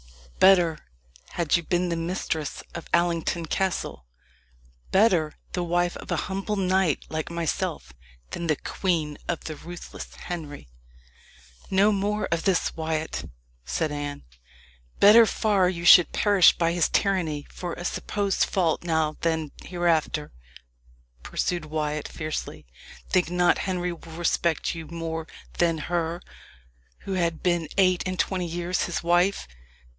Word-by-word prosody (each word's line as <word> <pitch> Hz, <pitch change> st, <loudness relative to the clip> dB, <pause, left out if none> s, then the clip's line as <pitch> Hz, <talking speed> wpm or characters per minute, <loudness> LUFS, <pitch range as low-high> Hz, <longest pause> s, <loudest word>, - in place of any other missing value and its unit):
Better 175 Hz, -4 st, +5 dB, 0.5 s
had 170 Hz, -4 st, +1 dB
you 170 Hz, -, +2 dB
been 175 Hz, +2 st, 0 dB
the 170 Hz, -, 0 dB
mistress 165 Hz, -3 st, -3 dB
of 170 Hz, -, -7 dB
Allington 170 Hz, -1 st, +1 dB
Castle 160 Hz, -, -2 dB, 0.8 s
better 185 Hz, -7 st, +3 dB, 0.2 s
the 180 Hz, -, -1 dB
wife 175 Hz, +1 st, 0 dB
of -, -, -11 dB
a -, -, +1 dB
humble 195 Hz, +2 st, -2 dB
knight 190 Hz, -4 st, +1 dB
like 155 Hz, -1 st, -3 dB
myself, 160 Hz, -, -3 dB, 0.4 s
than 170 Hz, -, -4 dB
the 155 Hz, -, +3 dB
queen 160 Hz, -3 st, -2 dB
of 170 Hz, -, -2 dB
the 155 Hz, -, -5 dB
ruthless 175 Hz, +3 st, -9 dB
Henry." 150 Hz, -, -7 dB, 1.0 s
"No 195 Hz, +2 st, +4 dB
more 210 Hz, +1 st, 0 dB
of 165 Hz, -1 st, +1 dB
this, 190 Hz, -3 st, +1 dB
Wyat," 160 Hz, -1 st, -3 dB, 0.3 s
said 65 Hz, -, -1 dB
Anne. 145 Hz, -1 st, -5 dB, 0.8 s
"Better 220 Hz, +3 st, +8 dB
far 200 Hz, -5 st, +2 dB
you 170 Hz, -2 st, -4 dB
should 175 Hz, -2 st, +8 dB
perish 200 Hz, -4 st, +5 dB
by 165 Hz, -1 st, +2 dB
his 170 Hz, -1 st, +1 dB
tyranny 165 Hz, -7 st, 0 dB
for 175 Hz, -2 st, -5 dB
a 175 Hz, -, -7 dB
supposed 200 Hz, +1 st, 0 dB
fault 175 Hz, -4 st, 0 dB
now 160 Hz, -2 st, 0 dB
than 160 Hz, -3 st, 0 dB
hereafter," 165 Hz, -4 st, 0 dB, 0.9 s
pursued 175 Hz, -, -2 dB
Wyat 150 Hz, -1 st, -2 dB
fiercely. 155 Hz, 0 st, -5 dB, 0.4 s
"Think 180 Hz, -3 st, +2 dB
not 175 Hz, 0 st, +3 dB
Henry 180 Hz, -1 st, -1 dB
will 165 Hz, -1 st, -12 dB
respect 170 Hz, -1 st, 0 dB
you 165 Hz, -2 st, -7 dB
more 165 Hz, 0 st, -5 dB, 0.3 s
than 170 Hz, -2 st, +3 dB
her 170 Hz, +1 st, -2 dB, 0.8 s
who 195 Hz, -, -5 dB
had 170 Hz, -3 st, -1 dB
been 175 Hz, -3 st, +1 dB
eight 185 Hz, -2 st, +4 dB
and 185 Hz, 0 st, -3 dB
twenty 185 Hz, -2 st, 0 dB
years 175 Hz, +1 st, -1 dB
his 175 Hz, -, -3 dB
wife. 175 Hz, -, +2 dB
170 Hz, 135 wpm, -25 LUFS, 160-180 Hz, 1.0 s, Better